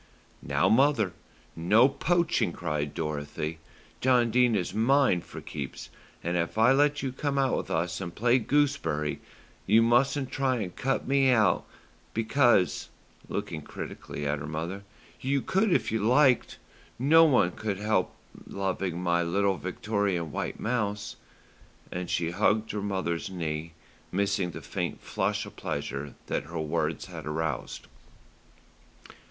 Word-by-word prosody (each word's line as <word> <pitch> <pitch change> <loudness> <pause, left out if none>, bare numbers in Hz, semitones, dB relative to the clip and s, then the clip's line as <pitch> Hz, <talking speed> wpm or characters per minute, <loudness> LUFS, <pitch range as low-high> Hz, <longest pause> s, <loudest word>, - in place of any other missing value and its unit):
"Now, - - +1
mother, 135 - +3 0.4
no 105 +10 +5
poaching," 175 +4 +1
cried 75 -1 -3
Dorothy. 75 0 -3 0.4
"John 125 -2 +3
Dene 125 -1 +4
is 90 -3 -1
mine 115 -3 +3
for - - -10
keeps, 70 -3 -7 0.3
and 85 +1 -1
if 85 +4 -2
I 115 +3 +6
let 145 +2 +3
you 135 - -1
come 140 +2 -2
out 135 -2 +2
with - - -3
us 90 +2 -1
and 85 -2 -6
play 120 +3 +3
gooseberry, 135 - 0 0.5
you 110 +3 +6
mustn't 130 +3 +2
try 135 -1 +1
and 100 -7 -4
cut 135 0 -1
me 135 0 +4
out, 110 -5 +3 0.5
because," 115 -4 +2 0.4
looking 80 - -4
critically 75 0 -7
at 70 0 0
her 70 - -6
mother, 80 +6 -4 0.4
"you 140 +1 0
could 195 +9 +1
if - - +2
you 110 - 0
liked. 130 +2 +3 0.4
Nobody 140 - +5
could 105 -3 -3
help 105 +2 0 0.3
loving 95 -3 -2
my 85 -1 +1
little 95 +3 +1
Victorian 95 -3 -2
white - - -4
mouse;" 105 -3 -2 0.8
and 90 0 -4
she 85 -1 0
hugged 110 +3 +1
her 105 - -3
mother's 95 -4 -2
knee, 80 -3 -4 0.4
missing 100 -1 0
the - - -8
faint - - -3
flush - - -1
of - - -12
pleasure 70 +1 -4
that 70 - -2
her 80 +1 -5
words 80 -1 -1
had - - -8
aroused. 80 +1 -3
100 Hz, 140 wpm, -28 LUFS, 85-130 Hz, 0.8 s, I